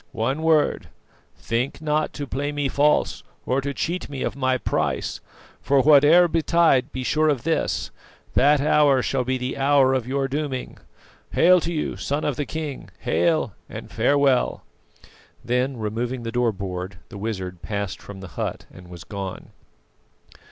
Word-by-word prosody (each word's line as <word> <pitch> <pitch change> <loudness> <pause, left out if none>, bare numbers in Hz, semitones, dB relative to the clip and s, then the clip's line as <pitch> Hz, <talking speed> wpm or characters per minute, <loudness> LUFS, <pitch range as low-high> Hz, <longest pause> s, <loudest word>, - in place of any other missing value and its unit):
One 130 +7 0
word 160 -2 +2 0.5
think 120 +4 -2
not 155 0 0
to 145 - -5
play 140 +2 -3
me 145 -1 -1
false, 145 +2 +2 0.2
or 130 +2 +1
to 140 +1 -3
cheat 170 +6 -3
me 140 -2 -4
of - - -2
my 130 -1 +1
price; - - -2 0.4
for 135 -1 +3
whate'er 155 +4 +7
betides, 160 -4 +3
be 130 - -4
sure 155 +4 +2
of 140 -5 0
this, 165 0 -1 0.4
that 145 +2 +4
hour 145 -3 +4
shall 135 -2 0
be 130 +1 -1
the 125 +1 -4
hour 135 -1 +4
of 130 -3 -1
your 135 +1 0
dooming. 140 -2 -4 0.5
Hail 180 +1 +6
to 165 - -3
you, 155 -3 -2
Son 145 +2 -2
of 145 - 0
the 145 +2 -3
King! 155 -4 -5
Hail! 135 - +1 0.2
and - - -8
farewell." 135 +2 +2 0.8
Then, 125 +2 0
removing 120 +3 -3
the 115 - -4
door 120 -1 +1
board, 95 -2 -6
the 100 - -9
wizard 95 -5 -4
passed 100 -3 -4
from 100 -2 -10
the 95 - -9
hut 70 - -4
and 90 -1 -13
was 85 -2 -10
gone. 100 -2 -7
135 Hz, 160 wpm, -23 LUFS, 115-150 Hz, 0.8 s, whate'er